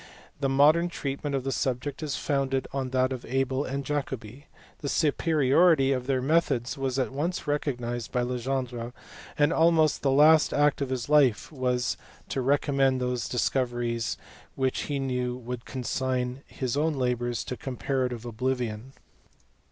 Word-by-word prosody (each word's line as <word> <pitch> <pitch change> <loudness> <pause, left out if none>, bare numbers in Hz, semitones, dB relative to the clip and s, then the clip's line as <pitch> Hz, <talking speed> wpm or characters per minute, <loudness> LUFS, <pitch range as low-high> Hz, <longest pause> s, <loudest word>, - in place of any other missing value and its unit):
The 140 -1 0
modern 155 +6 +4
treatment 140 -2 -3
of 135 - -1
the 135 - -2
subject 130 +3 -2
is 150 -3 -2
founded 135 -2 -1
on 135 -2 -2
that 130 0 +1
of 125 - -6
Abel 135 +1 0
and 140 +1 -3
Jacobi. 135 -2 -4 0.3
The 140 - -4
superiority 150 -1 +3
of 130 -2 -1
their 130 -2 +1
methods 135 -5 +1
was 135 -2 -2
at 130 -1 0
once 160 +7 -2
recognized 120 -5 -2
by 125 - +1
Legendre, 125 -1 -3 0.4
and 145 +1 +3
almost 160 -2 +3
the 140 - +2
last 150 +3 +5
act 145 -1 +3
of 140 - -1
his 130 -2 -3
life 145 -6 +3
was 125 -3 -1 0.3
to 135 - -1
recommend 135 -1 +2
those 125 -2 -2
discoveries 120 -2 -1 0.4
which 130 -1 0
he 145 - 0
knew 125 -2 -2
would 125 -1 -6
consign 130 0 -2
his 130 -2 -3
own 155 +2 +1
labours 120 -3 -1
to 125 - -5
comparative 125 -2 -3
oblivion. 120 0 -3
130 Hz, 150 wpm, -27 LUFS, 125-145 Hz, 0.4 s, last